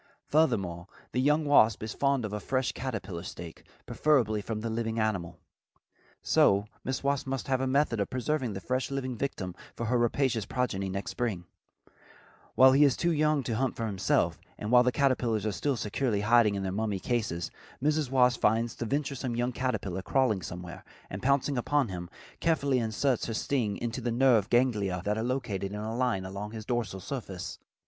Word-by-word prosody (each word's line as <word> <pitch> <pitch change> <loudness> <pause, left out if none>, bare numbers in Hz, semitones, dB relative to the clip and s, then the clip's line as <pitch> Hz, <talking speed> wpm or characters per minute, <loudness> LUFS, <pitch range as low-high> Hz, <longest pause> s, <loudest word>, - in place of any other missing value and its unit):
Furthermore, 95 - +1 0.2
the 125 - 0
young 150 +3 +3
wasp 115 -7 +4
is 110 - -4
fond 140 -4 +1
of 105 0 -4
fresh 130 +1 0
caterpillar 105 -9 -5
steak, 85 -2 -9 0.2
preferably 120 -9 +2
from 110 +1 -4
the 115 - -3
living 115 0 -2
animal. 90 -6 -1 0.9
So 100 +1 +4 0.2
Mrs. 130 +1 -3
Wasp 140 -1 0
must 135 -1 -3
have 130 -1 +1
a 130 - 0
method 130 -4 +2
of 100 - -1
preserving 130 -2 -1
the 95 - -6
fresh 130 +1 -1
living 130 -2 -3
victim 105 -8 -3 0.2
for 115 - -3
her 120 +2 +1
rapacious 120 -1 +1
progeny 100 -7 -1
next 100 +1 -4
spring, 105 -8 -2 1.1
while 130 +1 +8
he 140 +3 +5
is 140 -3 +4
too 170 - +1
young 155 -2 +2
to 115 -2 -2
hunt 130 0 0
for 115 - -3
himself, 100 -4 +1 0.2
and 105 - -4
while 125 0 +8
the 125 0 +2
caterpillars 120 -5 +1
are 110 - +1
still 135 +6 -1
securely 105 0 -1
hiding 110 -1 +4
in 100 - -2
their 95 - -2
mummy 105 0 -1
cases, 95 -6 -2 0.3
Mrs. 150 0 +1
Wasp 125 -2 +3
finds 115 +2 +2
the 115 - -5
venturesome 140 -2 -2
young 120 +1 0
caterpillar 120 -8 -2
crawling 110 -1 +1
somewhere, 90 +2 -8 0.3
and 95 - -5
pouncing 140 0 +2
upon 140 -1 +1
him, 90 -2 -6 0.3
carefully 140 -5 +2
inserts 120 +3 0
her 115 - -3
sting 110 -6 -1
into 120 +1 -3
the 120 - -1
nerve 120 -4 +3
ganglia 105 -8 +1
that 105 +1 0
are - - -1
located 115 -6 -2
in 105 - -4
a 110 +2 -4
line 120 -7 0
along 100 +3 -6
his 110 -2 -7
dorsal 115 -6 -2
surface. 100 -5 -6
120 Hz, 185 wpm, -29 LUFS, 100-130 Hz, 1.1 s, while